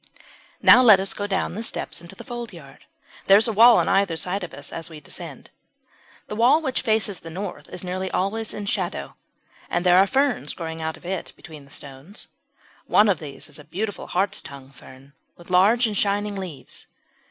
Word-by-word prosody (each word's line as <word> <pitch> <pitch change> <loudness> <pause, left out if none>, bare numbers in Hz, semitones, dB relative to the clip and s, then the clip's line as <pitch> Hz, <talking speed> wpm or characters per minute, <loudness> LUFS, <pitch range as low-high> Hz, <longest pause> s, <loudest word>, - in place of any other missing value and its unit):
Now 250 - +9
let 215 -6 +8
us 195 0 -2
go 205 - -4
down 190 -2 -1
the 215 - -4
steps 230 - -5
into 170 +2 -12
the - - -10
foldyard; 210 - -9 0.4
there 195 - +8
is 220 - +2
a 225 - -1
wall 230 +3 +8
on - - +2
either 195 -4 +2
side 185 +4 -2
of 175 - -6
us - - -7
as 165 - -5
we 160 -2 -10
descend. 145 - -9 0.8
The 210 - -5
wall 245 +8 +5
which 265 -5 -1
faces 215 -5 +1
the 165 - -10
north 185 +3 -6
is - - -6
nearly 185 +1 -3
always 210 +5 -1
in 205 - -5
shadow, 200 - -3 0.5
and 175 +1 -1
there 180 0 +6
are 195 - +5
ferns 265 - 0
growing 160 -1 -6
but 160 0 -3
of - - -18
it 185 0 -4
between 155 -4 -12
the - - -20
stones. 140 - -8 0.6
One 210 0 +5
of 185 -6 +2
these 145 -3 -9
is 150 -1 -11
a - - -11
beautiful 205 +6 -4
Hartstongue 140 -8 -3
fern, 135 +1 -16 0.2
with 175 +1 -14
large 210 +7 +5
and 215 -2 -2
shining 205 +1 0
leaves. 170 -10 -8
190 Hz, 200 wpm, -23 LUFS, 160-210 Hz, 0.8 s, Now